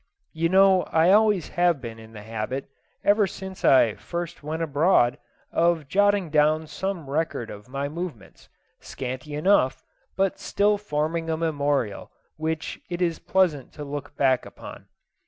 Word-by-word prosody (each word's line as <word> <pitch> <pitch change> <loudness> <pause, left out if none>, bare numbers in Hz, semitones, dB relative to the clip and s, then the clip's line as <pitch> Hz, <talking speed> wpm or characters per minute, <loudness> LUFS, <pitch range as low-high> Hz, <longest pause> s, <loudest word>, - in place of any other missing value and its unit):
You 165 +1 0
know 190 0 +5
I 165 +2 +4
have 205 +3 +8
always 210 -6 +1
been 140 -11 0
in 110 0 -14
the 105 -1 -10
habit, 115 +5 -4 0.4
ever 205 0 +4
since 190 0 -9
I 120 -5 +5
first 170 +12 -6
went 155 +2 -3
abroad, 145 -4 +3 0.3
of 165 -3 +1
jotting 205 -1 +2
down 155 +1 +3
some 185 -1 -4
record 145 -5 -2
of 105 +4 -11
my 140 +2 -3
movements, 155 - -8 0.3
scanty 130 +3 -6
enough, 150 -4 +2 0.3
but 195 -1 0
still 205 0 +1
forming 165 -3 -2
a 160 - 0
memorial 145 -9 -1 0.3
which 160 0 -4
it 175 -1 -4
is 170 -2 0
pleasant 170 -9 0
to 150 - -7
look 145 0 -7
back 130 -3 +3
upon. - - -11
160 Hz, 150 wpm, -25 LUFS, 135-180 Hz, 0.4 s, have